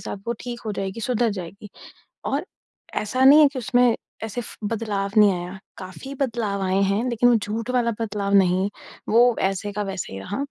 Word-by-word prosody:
साथ - - -5
वो - - +2
ठीक 240 -1 -6
हो 215 - -1
जाएगी, 195 +2 -4
सुधर 235 0 +1
जाएगी 195 +2 -8 0.6
और - - -1 0.5
ऐसा 255 +5 0
नहीं 290 +3 +9
है 295 - +8
कि 260 - -3
उसमें 245 +2 +3 0.3
ऐसे 225 +2 -4
फ - - -10
बदलाव 205 -3 -2
नहीं 210 -2 +7
आया, 180 +2 -6 0.2
काफ़ी 195 +9 -8
बदलाव 230 -7 -2
आए 190 +1 +1
हैं, 200 +4 +1
लेकिन 245 +1 +3
वो 240 - +5
झूठ 220 +2 -3
वाला 240 -2 +1
बदलाव 200 -2 -2
नहीं, 190 +1 +3 0.4
वो 240 +2 +5
वैसे 195 +1 -1
का 210 - -2
वैसे 195 - -5
ही 95 - -6
रहा। 200 - -5
210 Hz, 195 wpm, -23 LUFS, 195-235 Hz, 0.6 s, नहीं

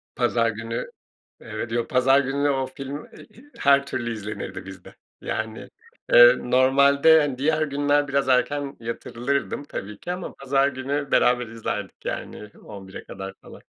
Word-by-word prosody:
Pazar 120 -2 +2
günü, 115 +1 -4 0.5
evet, 115 - -6
yo, 120 0 -1
pazar 135 +2 +4
gününe 140 +1 0
o 135 -1 0
film, 135 +2 -7
e - - -15
i 240 +6 -19
her 140 0 +4
türlü 120 -4 -3
izlenirdi 105 -1 -6
bizde. - - -12 0.3
Yani, 110 0 -4 0.4
eee, - - +9
normalde, 140 +5 +5
hani, 145 -4 -2
diğer 155 +3 +1
günler 145 0 +1
biraz 140 -1 0
erken 140 +2 +1
yatırılırdım 120 +5 -3
tabii 105 -7 -7
ki, 175 - -5
ama 180 0 -5
pazar 135 0 +1
günü 140 +1 -3
beraber 125 -1 +3
izlerdik, 115 0 -6
yani, 105 - -5
23.00´e 95 -2 -10
kadar 95 0 -8
falan. - - -13
135 Hz, 150 wpm, -24 LUFS, 115-145 Hz, 0.5 s, eee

